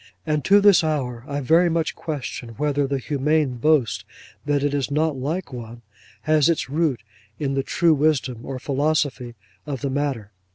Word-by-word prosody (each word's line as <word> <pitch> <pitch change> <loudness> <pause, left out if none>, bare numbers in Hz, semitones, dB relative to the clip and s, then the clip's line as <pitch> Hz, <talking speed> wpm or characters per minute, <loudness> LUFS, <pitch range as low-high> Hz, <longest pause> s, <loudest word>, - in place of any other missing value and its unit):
And 150 -2 0
to 200 +1 +6
this 200 -4 +6
hour 130 -7 -2
I 145 -1 -3
very 165 +6 +4
much 165 -1 0
question 130 -6 -6
whether 145 -1 0
the 140 0 -1
humane 145 0 0
boast 145 -2 +2 0.4
that 145 -1 +1
it 145 -1 0
is 140 -2 -1
not 155 +1 +1
like 145 +4 -4
one, 120 -1 -8 0.4
has 155 0 +3
its 155 -5 -1
root 145 -7 0 0.3
in 140 -2 -2
the 135 - +1
true 170 +4 +2
wisdom 135 -5 0
or 135 - -5
philosophy 140 -3 -1 0.3
of 140 -4 -4
the 140 -2 -2
matter. 135 -7 -2
145 Hz, 170 wpm, -23 LUFS, 130-155 Hz, 0.4 s, to